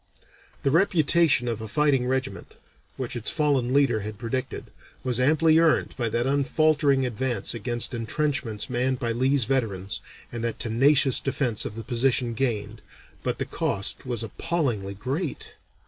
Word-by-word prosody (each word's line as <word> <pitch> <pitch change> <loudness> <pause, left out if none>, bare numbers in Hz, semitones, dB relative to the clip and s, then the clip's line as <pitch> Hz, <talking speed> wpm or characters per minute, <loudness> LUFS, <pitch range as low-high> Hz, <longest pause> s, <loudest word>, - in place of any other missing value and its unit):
The 135 - +2
reputation 165 -6 +3
of 115 -2 -3
a 110 - -5
fighting 135 0 +1
regiment, 130 +1 -3 0.4
which 130 -2 -3
its 120 - +1
fallen 140 -5 +1
leader 140 -5 +3
had 105 0 -6
predicted, 125 +3 -4 0.3
was 125 -2 0
amply 155 +4 +4
earned 165 -2 +2
by 120 -3 -1
that 120 +2 0
unfaltering 140 0 +2
advance 125 +1 -1
against 120 +1 -1
intrenchments 120 -2 -2
manned 130 +1 0
by 120 -2 -2
Lee's 130 +3 +2
veterans, 105 -7 -2 0.3
and 120 -1 -5
that 115 -1 -2
tenacious 135 +3 +3
defence 125 -5 -1
of 105 - -5
the 115 - -6
position 120 +1 +1
gained, 110 -3 -2 0.4
but - - -2
the - - -2
cost 100 0 -1
was 120 -3 -3
appallingly 115 - -2
great. 135 - -4
125 Hz, 145 wpm, -25 LUFS, 115-140 Hz, 0.4 s, amply